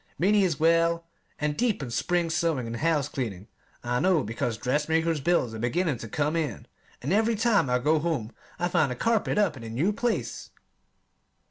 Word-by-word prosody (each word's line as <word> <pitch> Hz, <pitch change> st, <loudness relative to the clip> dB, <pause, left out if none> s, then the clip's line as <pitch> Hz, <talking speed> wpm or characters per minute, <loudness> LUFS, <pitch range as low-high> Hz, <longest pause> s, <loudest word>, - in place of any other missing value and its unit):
Minnie 205 Hz, +3 st, +3 dB
is 170 Hz, -6 st, 0 dB
well 165 Hz, +1 st, +3 dB, 0.3 s
and 150 Hz, 0 st, -1 dB
deep 225 Hz, -, 0 dB
in 125 Hz, -, -6 dB
spring 170 Hz, +7 st, 0 dB
sewing 160 Hz, -7 st, 0 dB
and 115 Hz, 0 st, -4 dB
house 150 Hz, -1 st, +1 dB
cleaning. 110 Hz, -9 st, -5 dB, 0.4 s
I 120 Hz, 0 st, 0 dB
know 180 Hz, -4 st, +3 dB
because 115 Hz, +1 st, -3 dB
dressmaker's 155 Hz, +5 st, 0 dB
bills 135 Hz, -7 st, +1 dB
are 110 Hz, -, -6 dB
beginning 140 Hz, +3 st, 0 dB
to 115 Hz, -, -7 dB
come 150 Hz, +6 st, 0 dB
in, 150 Hz, -10 st, -2 dB, 0.4 s
and 145 Hz, +8 st, 0 dB
every 225 Hz, +2 st, +3 dB
time 215 Hz, -, +2 dB
I 125 Hz, -, +3 dB
go 150 Hz, +5 st, +2 dB
home 150 Hz, -9 st, -2 dB, 0.3 s
I 175 Hz, -, 0 dB
find 150 Hz, -6 st, +2 dB
a -, -, -3 dB
carpet 225 Hz, -, 0 dB
up 200 Hz, -7 st, +2 dB
in 120 Hz, -, -10 dB
a 115 Hz, -, -6 dB
new 150 Hz, -, 0 dB
place! 235 Hz, +1 st, -2 dB
155 Hz, 190 wpm, -27 LUFS, 125-175 Hz, 0.4 s, Minnie